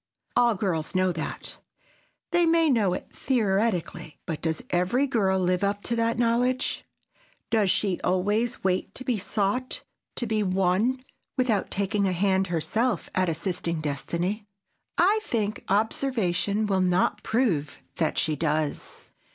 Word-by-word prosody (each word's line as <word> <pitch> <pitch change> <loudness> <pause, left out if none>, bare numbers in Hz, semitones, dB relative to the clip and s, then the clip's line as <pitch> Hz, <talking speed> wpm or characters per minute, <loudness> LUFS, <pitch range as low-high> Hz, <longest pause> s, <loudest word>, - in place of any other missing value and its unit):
All 240 -2 +4
girls 180 -4 -2
know 185 0 +3
that." 160 -2 -5 0.7
They 345 -1 +4
may 330 -2 +4
know 210 -7 +3
it - - -7
theoretically, 195 - 0
but 160 -3 -4
does 160 -1 -1
every 185 +10 +2
girl 205 -8 +2
live 180 +1 +1
up 200 +1 0
to 235 - 0
that 230 0 +1
knowledge? 245 +2 +1 0.7
Does 215 -4 +3
she 190 -1 +1
always 205 +6 0
wait 185 -1 0
to 260 - -5
be 245 -5 0
sought, 205 +6 -1 0.3
to 240 - +1
be 220 -1 0
won, 195 +7 +1 0.3
without 235 -6 +1
taking 200 +1 0
a 185 - +1
hand 190 +1 +2
herself 205 +6 -1
at 185 -1 +2
assisting 170 0 -2
destiny? 170 +8 -2 0.5
I 405 +5 +4
think 215 - -2
observation 210 -2 +1
will 195 -2 +1
not 185 +3 +2
prove 185 - 0 0.2
that 160 -2 0
she 155 -1 +1
does. 155 0 -2
200 Hz, 140 wpm, -26 LUFS, 180-230 Hz, 0.7 s, All